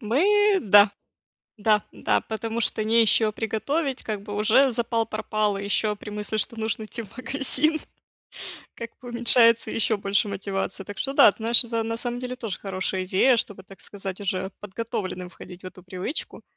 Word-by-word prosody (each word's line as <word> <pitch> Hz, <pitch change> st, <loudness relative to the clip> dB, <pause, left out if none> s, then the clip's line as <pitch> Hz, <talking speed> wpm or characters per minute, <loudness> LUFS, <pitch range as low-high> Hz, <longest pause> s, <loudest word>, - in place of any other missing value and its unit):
Мы, 390 Hz, -, +3 dB
да. 205 Hz, 0 st, +6 dB, 0.7 s
Да, 210 Hz, -1 st, +3 dB
да, -, -, 0 dB
потому 225 Hz, +1 st, -4 dB
что 215 Hz, -, +1 dB
не 230 Hz, +1 st, +4 dB
из 220 Hz, -, +4 dB
чего 215 Hz, -2 st, +4 dB
приготовить, 265 Hz, +7 st, -2 dB
как 210 Hz, -2 st, -4 dB
бы 205 Hz, -1 st, -7 dB
уже 235 Hz, +5 st, +3 dB
запал 230 Hz, -1 st, 0 dB
пропал, 215 Hz, -2 st, -2 dB
ещё 205 Hz, +1 st, 0 dB
при 210 Hz, -, -11 dB
мысли, 210 Hz, +1 st, -3 dB
что 225 Hz, +2 st, -2 dB
нужно 220 Hz, 0 st, -2 dB
идти 235 Hz, -, -6 dB
в 210 Hz, 0 st, -15 dB
магазин, 280 Hz, +4 st, 0 dB, 1.0 s
как 230 Hz, 0 st, -7 dB
бы 245 Hz, -, -10 dB
уменьшается 235 Hz, -1 st, +4 dB
ещё 220 Hz, -1 st, 0 dB
больше 200 Hz, +2 st, 0 dB
мотивация. 195 Hz, -1 st, -4 dB
Так 205 Hz, -, -8 dB
что 275 Hz, -, -1 dB
да, 210 Hz, -, +7 dB
знаешь, 230 Hz, +2 st, +4 dB
это 230 Hz, -1 st, -2 dB
на 225 Hz, 0 st, -3 dB
самом 245 Hz, +1 st, -4 dB
деле 250 Hz, 0 st, -5 dB
тоже 225 Hz, -6 st, -5 dB
хорошая 190 Hz, -1 st, -3 dB
идея, 200 Hz, +7 st, +3 dB
чтобы, 205 Hz, -4 st, -3 dB
так 190 Hz, -2 st, -15 dB
сказать, 195 Hz, +2 st, -8 dB
уже 190 Hz, -1 st, -3 dB
подготовленным 205 Hz, -3 st, -5 dB
входить 180 Hz, +1 st, -13 dB
в -, -, -6 dB
эту 185 Hz, 0 st, -11 dB
привычку. 185 Hz, -, -5 dB
220 Hz, 175 wpm, -24 LUFS, 200-235 Hz, 1.0 s, да